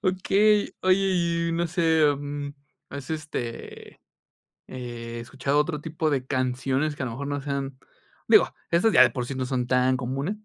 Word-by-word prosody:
Okey. 200 Hz, +2 st, +2 dB
Oye, 185 Hz, 0 st, +4 dB, 0.5 s
y -, -, -1 dB
no 170 Hz, +1 st, 0 dB
sé, 165 Hz, -2 st, +2 dB, 0.2 s
mm, 145 Hz, 0 st, -5 dB, 0.4 s
¿has, 140 Hz, +1 st, -8 dB
este, 155 Hz, -7 st, -6 dB, 0.7 s
eh, 120 Hz, -2 st, -7 dB
escuchado 135 Hz, +4 st, -1 dB
otro 150 Hz, 0 st, 0 dB
tipo 160 Hz, 0 st, -2 dB
de 135 Hz, -4 st, 0 dB
canciones 130 Hz, +3 st, -1 dB
que 140 Hz, -, -6 dB
a -, -, -1 dB
lo 115 Hz, -, -4 dB
mejor 140 Hz, +4 st, -5 dB
no 145 Hz, 0 st, -2 dB
sean? 140 Hz, -1 st, -4 dB, 0.5 s
Digo, -, -, +6 dB, 0.2 s
esas 190 Hz, +6 st, +3 dB
ya -, -, +8 dB
de -, -, +5 dB
por 125 Hz, -3 st, -4 dB
sí 135 Hz, -, -5 dB
no 130 Hz, 0 st, -2 dB
son 125 Hz, -1 st, -1 dB
tan 125 Hz, +1 st, +2 dB
comunes. 135 Hz, -, -3 dB
140 Hz, 170 wpm, -25 LUFS, 130-160 Hz, 0.7 s, ya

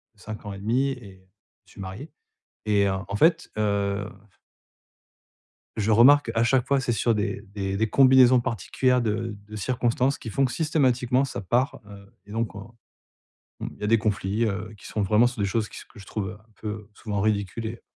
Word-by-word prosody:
5 105 Hz, +1 st, -9 dB
ans 100 Hz, -, -5 dB
et 100 Hz, -, -8 dB
demi, 120 Hz, +7 st, +1 dB
et 100 Hz, -7 st, -11 dB, 0.4 s
je -, -, -22 dB
suis -, -, -11 dB
marié, 95 Hz, +11 st, -8 dB, 0.5 s
et 105 Hz, -2 st, +3 dB
heu, 95 Hz, -, +1 dB
en 100 Hz, -, -4 dB
fait, 165 Hz, +8 st, +3 dB
heu 100 Hz, -1 st, 0 dB, 1.7 s
je 110 Hz, 0 st, +1 dB
remarque, 125 Hz, +3 st, +6 dB
à 115 Hz, -, +3 dB
chaque 125 Hz, +1 st, +2 dB
fois, 140 Hz, -1 st, +3 dB
c'est 125 Hz, -, -1 dB
sur 115 Hz, 0 st, +1 dB
des 105 Hz, -1 st, -2 dB
des 100 Hz, -1 st, -2 dB
des 110 Hz, +1 st, 0 dB
combinaisons 130 Hz, 0 st, +6 dB
particulières 125 Hz, +5 st, 0 dB
de 115 Hz, -1 st, -2 dB
de 105 Hz, -, -9 dB
circonstances, 125 Hz, +4 st, 0 dB
qui 115 Hz, -, -8 dB
font 135 Hz, +6 st, +1 dB
que, 130 Hz, -, +1 dB
systématiquement, 130 Hz, -3 st, +1 dB
ça 135 Hz, -, -4 dB
part, 120 Hz, +8 st, 0 dB
heu, 100 Hz, -1 st, -13 dB
et 100 Hz, -, -13 dB
donc 115 Hz, 0 st, -2 dB
on 105 Hz, +3 st, -10 dB, 0.9 s
on -, -, -4 dB
il -, -, -16 dB
y -, -, -5 dB
a -, -, 0 dB
des 115 Hz, +2 st, +5 dB
conflits, 105 Hz, +1 st, 0 dB
heu, 110 Hz, 0 st, -3 dB
qui -, -, -12 dB
sont 105 Hz, -, -2 dB
vraiment 105 Hz, +5 st, +4 dB
sur 125 Hz, -1 st, -6 dB
des 100 Hz, -, +1 dB
choses 105 Hz, +2 st, -1 dB
qui -, -, -11 dB
se -, -, -10 dB
que -, -, -17 dB
je 100 Hz, -, -12 dB
trouve 100 Hz, -3 st, -3 dB
un 105 Hz, +3 st, -16 dB
peu, 110 Hz, -, -4 dB
heu 105 Hz, -1 st, -7 dB
souvent 105 Hz, -3 st, -3 dB
ridicule 105 Hz, +1 st, -1 dB
et 115 Hz, +1 st, -7 dB
110 Hz, 205 wpm, -25 LUFS, 100-125 Hz, 1.7 s, remarque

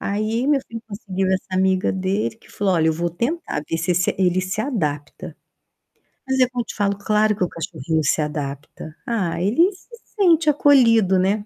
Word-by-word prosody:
Aí, 215 Hz, +5 st, -1 dB
meu 290 Hz, -2 st, +3 dB
filho 230 Hz, 0 st, -8 dB
conseguiu 195 Hz, -2 st, -3 dB
essa 190 Hz, 0 st, -1 dB
amiga 190 Hz, 0 st, +2 dB
dele 190 Hz, +4 st, -1 dB
que -, -, -21 dB
falou: 195 Hz, -2 st, 0 dB
"Olha, 160 Hz, -1 st, +2 dB
eu -, -, +3 dB
vou 170 Hz, +2 st, -2 dB
tentar 240 Hz, -, -3 dB
ver 165 Hz, -, -1 dB
se 170 Hz, +2 st, -1 dB
esse 180 Hz, +1 st, +1 dB
ele 185 Hz, -1 st, +2 dB
se 185 Hz, +3 st, -3 dB
adapta". 150 Hz, -, -4 dB, 0.9 s
Mas 265 Hz, 0 st, 0 dB
é 255 Hz, -, +5 dB
como 250 Hz, -1 st, -2 dB
eu -, -, -6 dB
te -, -, -8 dB
falo: 200 Hz, -1 st, 0 dB
claro 210 Hz, +1 st, +1 dB
que 190 Hz, -, -1 dB
o -, -, +1 dB
cachorrinho 160 Hz, -1 st, -3 dB
se 150 Hz, +2 st, +1 dB
adapta. 150 Hz, +1 st, -6 dB
Ah, 190 Hz, -9 st, -1 dB
ele 320 Hz, -, +3 dB
se 375 Hz, -, -20 dB, 0.3 s
sente 335 Hz, -5 st, +4 dB
acolhido, 230 Hz, -10 st, +4 dB
né. 205 Hz, +3 st, 0 dB
200 Hz, 195 wpm, -21 LUFS, 175-230 Hz, 0.9 s, é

